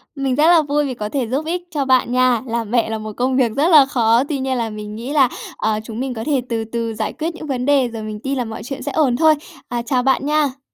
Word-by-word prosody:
Mình 270 -2 -1
rất 305 +3 +4
là 340 -2 +6
vui 295 0 0
vì 265 - -3
có 210 -3 -5
thể 260 -1 -2
giúp 270 +7 -2
ích 350 +2 -2
cho 290 -4 -1
bạn 255 -2 +3
nha. 255 -2 +3
Làm 230 -2 -3
mẹ 235 -2 +2
là 220 - -2
một 215 0 -7
công 255 +1 +1
việc 245 -4 +2
rất 290 +4 +2
là 295 -4 +8
khó, 235 -2 +2
tuy 290 -3 -1
nhiên 260 -1 -1
là 230 -2 -1
mình 210 0 -7
nghĩ 240 +6 -5
là, 270 -4 +4 0.3
ờ, 215 -1 0
chúng 225 +1 -7
mình 265 -1 -2
có 225 -2 -5
thể 285 -4 +1
từ 225 -1 -1
từ 230 0 -3
giải 220 0 -3
quyết 330 +2 -4
những 310 - -8
vấn 250 -2 -2
đề 275 -3 +3
rồi 225 -2 -7
mình 215 -1 -6
tin 270 +4 -3
là 245 - -1
mọi 220 -1 -7
chuyện 270 +3 -6
sẽ 290 - -3
ổn 275 -5 +2
thôi. 315 +1 +5 0.3
À, 240 -1 -2
chào 250 +1 0
bạn 270 +1 +2
nha. 295 -3 +1
255 Hz, 290 wpm, -19 LUFS, 230-285 Hz, 0.3 s, là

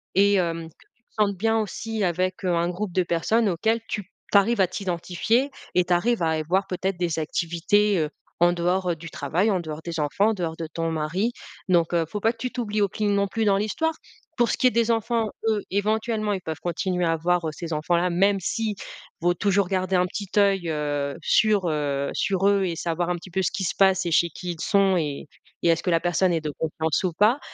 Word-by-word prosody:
et 200 +1 +5
hem, 165 -3 -1
que - - -25 0.2
tu 240 - -41
te - - -41
sentes 200 -2 +1
bien 225 +2 +2
aussi 220 +1 -3
avec 185 +2 -1
un 170 -2 +1
groupe 185 +2 -4
de 185 +1 +1
personnes 190 +7 +1
auxquelles 220 +6 +1
tu 210 - -2 0.3
tu 200 - +6
arrives 220 +2 +1
à - - +6
t'identifier 190 +8 -1 0.2
et 180 - +5
tu 180 - +1
arrives 210 +2 +1
à 160 - +2
avoir 165 +5 0
peut-être 190 0 -2
des 170 -2 -1
activités, 170 +5 +1
heu, 155 -1 0 0.3
en 175 +1 +5
dehors, 180 +2 0
heu, 170 - -1
du 160 +1 -9
travail, 175 +9 0
en 185 - +1
dehors 155 -1 -6
des 170 -2 -4
enfants, 175 +8 +2
en 225 - +1
dehors 170 -4 -3
de 165 - -4
ton 165 0 -1
mari, 165 +8 -1 0.4
donc 170 -1 +3
heu, 165 -1 +2
faut 210 -1 -4
pas 225 - +3
que - - -26
tu 250 - -4
t'oublies 215 -4 -2
au 200 - +4
cline 205 +1 0
non 200 0 +2
plus 220 +2 -1
dans 195 -1 +4
l'histoire. 320 +11 0 0.4
Pour 240 -1 +3
ce - - 0
qui - - 0
est 250 - +3
des 235 0 +1
enfants, 230 0 +1 0.2
eux, 210 -2 +1
éventuellement 215 +1 0
ils 190 - -3
peuvent 160 -2 -5
continuer 180 +1 -1
à 165 - +2
voir, 175 +1 +1
heu, 155 - -1
ces 165 +1 -6
enfants-là 170 +4 +1
même 195 +3 +2
si, 215 +3 -2 0.4
vaut 175 +1 +2
toujours 200 0 +1
garder 185 0 0
un 180 - +3
petit 200 +1 -6
oeil, 195 -3 +3
heu, 145 -2 -2
sur, 210 -1 +3
heu, 140 -2 -1
sur 195 0 +1
eux 200 -1 +3
et 170 -2 -2
savoir 170 +1 -1
un - - 0
petit 175 - -12
peu 190 - 0
ce - - +1
qui 220 -3 -3
se - - -2
passe 190 -2 +4
et - - -2
chez 170 +1 +3
qui 175 +2 -5
ils 160 - -10
sont 195 -3 +3
et 150 -2 -3 0.4
et - - +3
est-ce 165 -1 +3
que 180 - 0
la 165 - +4
personne 175 +1 +1
est 165 - 0
de 155 - -3
confiance 160 +1 -1
ou 180 -2 0
pas? 215 - +3
185 Hz, 240 wpm, -24 LUFS, 170-205 Hz, 0.4 s, tu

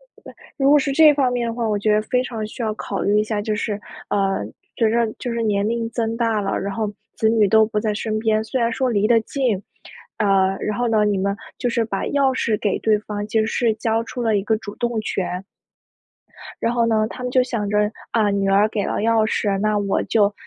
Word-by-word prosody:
对， - - -27 0.5
如 275 +1 +4
果 295 - +7
是 280 -1 -1
这 305 0 +7
方 265 -3 +1
面 240 -1 -1
的 230 - -3
话， 235 -2 -1
我 210 -1 0
觉 210 +1 +1
得 210 - +3
非 250 +3 0
常 225 -4 -4
需 235 +3 -7
要 215 -1 0
考 200 -2 -4
虑 205 +1 +2
一 - - 0
下， 215 -1 -2
就 215 0 -1
是， 210 -1 -3 0.3
呃， 195 - 0 0.3
随 225 -2 +2
着 230 -1 +1
就 245 - -4
是 235 0 -2
年 205 -1 +1
龄 230 0 -1
增 230 -1 -2
大 225 -3 +1
了， 195 - -1
然 195 0 -3
后 215 -1 -2 0.2
子 220 - +1
女 220 -2 +4
都 220 +1 +5
不 215 -1 -2
在 215 -1 0
身 215 0 -2
边。 215 -1 +1
虽 245 +3 -2
然 230 0 +1
说 260 0 0
离 210 -1 +2
得 230 -1 +4
近， 225 -5 -1 0.6
呃， 195 -2 +2
然 210 +2 -2
后 245 - +1
呢， 215 -2 +3
你 205 -2 +1
们 200 +1 -1 0.2
就 245 - -1
是 230 -1 0
把 195 -3 -3
钥 275 -2 +1
匙 220 -4 0
给 205 - 0
对 215 -1 +2
方， 205 -1 -5
其 220 - 0
实 220 - +1
是 225 -1 +1
交 225 +1 0
出 240 +1 -6
了 220 -2 +2
一 195 - 0
个 220 +1 +1
主 205 -1 -8
动 235 -2 -1
权。 190 -3 -3 1.2
然 230 - +1
后 235 -1 +2
呢， 215 -1 +2
他 250 - -8
们 250 - -2
就 255 -1 +4
想 225 -5 -3
着： 210 0 +1 0.2
“啊， 215 -3 +2
女 200 -1 0
儿 200 +2 +4
给 205 -2 -2
了 - - -2
钥 225 0 +2
匙， 200 -2 0
那 215 0 +1
我 200 -1 0
就， 210 -2 +2
220 Hz, 265 characters per minute, -21 LUFS, 205-235 Hz, 1.2 s, 果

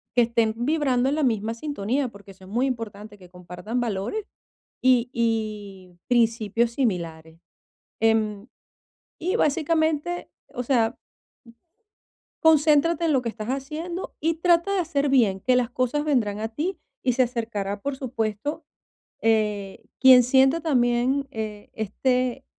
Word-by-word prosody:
que 245 - +5
estén 230 -1 +1
vibrando 260 0 +1
en 285 - 0
la 310 - 0
misma 225 -3 0
sintonía, 265 0 -2
porque 200 -3 -13
eso 190 0 -16
es - - -13
muy 245 +6 +1
importante, 215 -4 -6
que 180 -2 -16
compartan 180 +6 -5
valores 230 - -3 0.6
y 250 -2 +3
y 210 -6 -3
principios 230 -1 +2
similares. 165 - -3 0.6
Em, 220 -2 +1 0.7
y 365 +5 -1
básicamente, 315 +1 0 0.2
o 250 - -3
sea 235 -2 +1 1.5
concéntrate 320 +1 +4
en 325 - +2
lo 265 -3 +2
que 235 - -3
estás 220 -1 -6
haciendo 310 +7 -5
y 330 +2 0
trata 345 +2 +3
de 385 - +2
hacer 290 -4 0
bien. 230 -8 +3
Que 255 +6 +2
las 250 -1 +1
cosas 255 +4 -1
vendrán 225 -9 0
a 220 - -2
ti 310 - -3 0.3
y 255 - +3
se 255 +2 +2
acercará, 225 -5 -3
por 280 +6 -3
supuesto, 250 +4 -3 0.6
eh, 210 -3 0 0.2
quien 260 -1 +8
sienta 265 +5 +3
también, 260 -1 +1
eh, 215 -4 -6
este 250 +4 -1
240 Hz, 140 wpm, -24 LUFS, 215-280 Hz, 1.5 s, quien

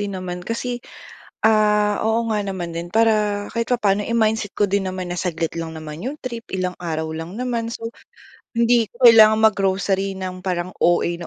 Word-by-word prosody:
din 200 -2 -3
naman 180 -1 -5
kasi 230 +3 -3 0.8
ah 210 -1 +3
oo 225 +1 +2
nga 210 -1 +1
naman 180 -3 -4
din 170 +1 -4
para 225 -1 +5 0.4
kahit 230 0 -1
papaano 205 -3 +1
eh 230 - -3
mindset 215 -2 -1
ko 210 - +4
din 200 -1 +1
naman 185 0 -4
na 175 - -3
saglit 165 -2 -2
lang 165 -1 -4
naman 155 +1 -8
'yong 280 +4 -4
trip, 235 -2 -5
ilang 180 -1 -2
araw 160 -2 -3
lang 165 +2 -7
naman, 235 -2 -2
so - - -8 0.7
hindi 235 -1 +3
ko 240 +1 +6
kailangan 220 -1 +7
mag-grocery 195 -1 0
ng 185 -1 -4
parang 180 0 -1
OA 175 0 +3
na 170 - -7
200 Hz, 185 wpm, -21 LUFS, 180-225 Hz, 0.8 s, kailangan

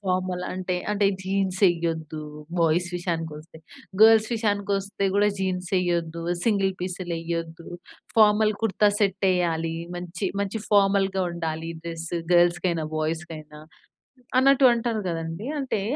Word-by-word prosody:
Formal 185 -1 -1
అంటే, 185 0 -2
అంటే 205 -1 +2 0.2
jeans 190 -1 -1
యేయొద్దు. 165 -3 -1 0.4
Boys 165 +2 +2
విషయానికొస్తే. 165 -2 -5 0.4
గర్ల్స్ 220 0 +7
విషయానికొస్తే 200 -2 -1
కూడా 205 +1 +4
జీన్సెయ్యొద్దు, 180 -3 -1 0.2
సింగిల్ 200 -4 +2
పీసులెయ్యొద్దు, 170 -2 -4 0.5
ఫార్మల్ 215 0 +5
కుర్తా 210 -1 +3
సెట్టెయ్యాలి. 180 -5 +1 0.2
మంచి, 175 +2 -4
మంచి 200 +2 -2
ఫార్మల్‌గా 195 -1 +3
ఉండాలి 165 -1 -4
డ్రెస్ 165 0 -6 0.2
గర్ల్స్‌కైనా, 175 -1 +3
బాయ్స్‌కైనా 155 -1 -4 0.8
అన్నట్టు 275 0 +6
అంటారు 230 -2 -1
కదండీ! 165 +6 -4
అంటే 260 -7 -2
180 Hz, 100 wpm, -25 LUFS, 165-200 Hz, 0.8 s, గర్ల్స్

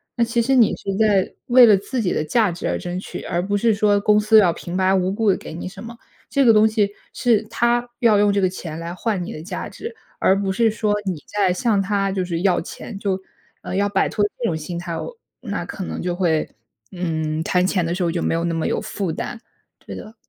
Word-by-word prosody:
那 235 - +2
其 235 0 +1
实 265 +3 +2
你 235 -4 +5
是 195 -1 -4
在 205 -4 +2
为 250 0 +8
了 215 -3 +7
自 235 +6 -3
己 185 - 0
的 155 - 0
价 210 +5 +2
值 170 - -4
而 - - 0
争 180 +1 -4
取， - - -7
而 175 +2 -2
不 205 +1 -1
是 225 +1 +3
说 205 0 +3
公 210 +1 +4
司 215 +1 +6
要 185 -5 +4
平 175 +2 -7
白 190 0 +3
无 185 0 +1
故 215 0 +1
地 - - 0
给 - - -9
你 170 +3 -6
什 195 +3 -9
么， 230 +1 -9 0.3
这 280 -2 +2
个 230 - +7
东 215 0 +6
西 210 -2 +1 0.2
是 235 -4 +2
它 240 +1 +1
要 225 -4 +4
用 205 0 +4
这 200 - +1
个 185 - +3
钱 165 -4 -7
来 170 +1 -5
换 195 -2 -2
你 - - -6
的 155 - -7
价 170 - -5
值， 455 0 -8 0.2
而 195 +1 +3
不 195 -1 -1
是 225 +3 +2
说 210 -1 0
你 180 -4 -2
在 200 -3 +1
向 205 +1 +1
它 195 0 0
就 190 -1 -1
是 170 -2 -3
要 185 -1 +2
钱， 200 - -8
就 190 -2 -1 0.4
呃， - - -5
要 200 +1 +1
摆 195 -1 +1
脱 205 - 0
这 240 - -3
种 165 - 0
心 160 +3 -5
态， 170 -1 -5 0.5
那 - - -4
可 195 - -6
能 - - -5
就 180 0 -1
会 170 -4 +1 0.4
嗯， 160 -3 -2
谈 180 +1 +2
钱 185 -3 +1
的 170 +1 -1
时 185 - -1
候 170 - +1
就 170 - -2
没 - - 0
有 165 0 0
那 170 - -1
么 165 -1 -1
有 - - 0
负 190 -5 -3
担， 225 - -5 0.4
对 - - -8
的。 220 - -10
195 Hz, 270 characters per minute, -21 LUFS, 180-220 Hz, 0.5 s, 为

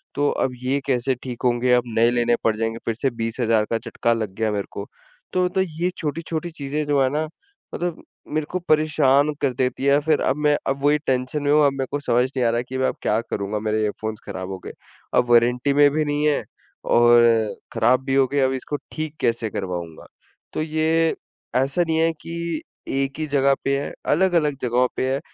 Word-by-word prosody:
तो 145 0 +2
अब 130 - 0
ये 135 +2 +1
कैसे 130 0 +1
ठीक 125 -3 -6
होंगे, 125 +1 +2
अब 125 0 +4
नए 115 +1 +5
लेने 120 -1 +2
पड़ 110 -1 +2
जाएँगे 115 0 -2
फिर 115 - -1
से 135 +4 0
20,000 115 -1 0
का 115 - +2
झटका 115 0 -1
लग 110 -4 -3
गया 110 0 0
मेरे 100 -1 -2
को। 100 - -6 0.5
तो 185 0 +2
तो 190 +1 0
ये 175 -1 -1
छोटी-छोटी 165 +2 -3
चीजें 150 -1 -3
जो 145 -1 +2
है 130 - +2
ना 155 +1 0 0.5
मतलब 175 -2 -3 0.3
मेरे 155 0 0
को 185 - -1
परेशान 150 -3 +3
कर 135 -3 +1
देती 130 +2 -1
है। 140 +1 +5
फिर 155 0 +1
अब 130 - +1
मैं 150 0 +5
अब 135 0 -2
वही 145 +1 +4
टेंशन 130 +3 0
में 145 - +2
हूँ 150 0 +5
अब 140 - +4
मेरे 135 -1 -3
को 145 - -1
समझ 125 -3 +2
नहीं 130 -2 +1
आ - - +3
रहा 120 +1 0
कि 130 - -3
मैं 130 0 +2
अब - - -2
क्या 105 - +1
करूँगा 100 +1 -2
मेरे 110 0 -1
ईयरफ़ोन 110 +1 -2
खराब 95 0 -6
हो 95 - -4
गए। - - -5 0.5
अब 120 - +2
वारंटी 120 +3 +4
में 145 0 +6
भी 155 +1 0
नहीं 145 0 0
है 150 - +1 0.5
और 120 0 +6 0.5
खराब 130 +2 +3
भी 135 -1 0
हो 135 -1 +4
गए। 140 - +1
अब 130 0 +2
इसको 135 +3 -4 0.2
ठीक 155 -1 -4
कैसे 115 -1 0
करवाऊँगा। 90 -5 -5 0.5
तो - - -2
ये 160 +1 +1 0.4
ऐसा 135 +7 +2
नहीं 160 0 +1
है 165 0 +3
कि 170 -1 -4 0.3
एक 135 +1 -2
ही 155 - -2
जगह 140 -1 +3
पे 140 0 +1
है, 145 - -5
अलग-अलग 160 -4 +2
जगहों 125 +1 +2
पे 130 0 0
है। 135 - -1
135 Hz, 215 wpm, -22 LUFS, 120-150 Hz, 0.5 s, में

